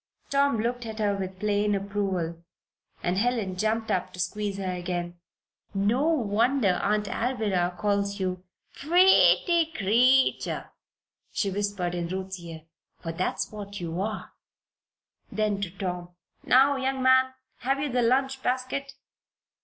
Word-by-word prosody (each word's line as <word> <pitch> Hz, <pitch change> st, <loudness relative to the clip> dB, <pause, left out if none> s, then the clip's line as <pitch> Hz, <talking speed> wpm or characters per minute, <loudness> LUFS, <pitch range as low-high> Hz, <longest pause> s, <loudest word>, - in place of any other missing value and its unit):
Tom 280 Hz, -3 st, +3 dB
looked 240 Hz, +2 st, -2 dB
at 220 Hz, -1 st, -6 dB
her 205 Hz, -2 st, +1 dB
with 190 Hz, -1 st, -5 dB
plain 205 Hz, 0 st, +1 dB
approval, 190 Hz, -4 st, -2 dB, 0.6 s
and 180 Hz, +2 st, 0 dB
Helen 225 Hz, -5 st, 0 dB
jumped 220 Hz, +3 st, -1 dB
up 185 Hz, 0 st, -1 dB
to 180 Hz, -, -10 dB
squeeze 200 Hz, +2 st, -2 dB
her 190 Hz, -2 st, -2 dB
again. 175 Hz, -1 st, -4 dB, 0.6 s
"No 220 Hz, +9 st, +2 dB
wonder 230 Hz, -, +2 dB
Aunt 210 Hz, 0 st, +1 dB
Alvirah 205 Hz, -8 st, -1 dB
calls 200 Hz, -1 st, 0 dB
you 185 Hz, -1 st, -2 dB, 0.3 s
'pretty 340 Hz, 0 st, +4 dB
creetur'," 250 Hz, +6 st, +2 dB, 0.6 s
she 200 Hz, -, -1 dB
whispered 200 Hz, -3 st, -2 dB
in 175 Hz, -1 st, -2 dB
Ruth's 190 Hz, +1 st, -5 dB
ear. 165 Hz, -2 st, -9 dB, 0.3 s
"For 165 Hz, -, -5 dB
that's 170 Hz, +3 st, -2 dB
what 205 Hz, -1 st, -7 dB
you 170 Hz, +1 st, -3 dB
are." 215 Hz, +1 st, -4 dB, 1.0 s
Then 210 Hz, -1 st, 0 dB
to 200 Hz, -, -2 dB
Tom: 180 Hz, -1 st, -5 dB, 0.3 s
"Now 270 Hz, +2 st, +5 dB
young 265 Hz, 0 st, -1 dB
man, 260 Hz, 0 st, +4 dB, 0.2 s
have 270 Hz, +2 st, -1 dB
you 285 Hz, -1 st, -2 dB
the 250 Hz, 0 st, +1 dB
lunch 265 Hz, +3 st, +1 dB
basket?" 255 Hz, +2 st, -2 dB
205 Hz, 135 wpm, -27 LUFS, 185-255 Hz, 1.0 s, Now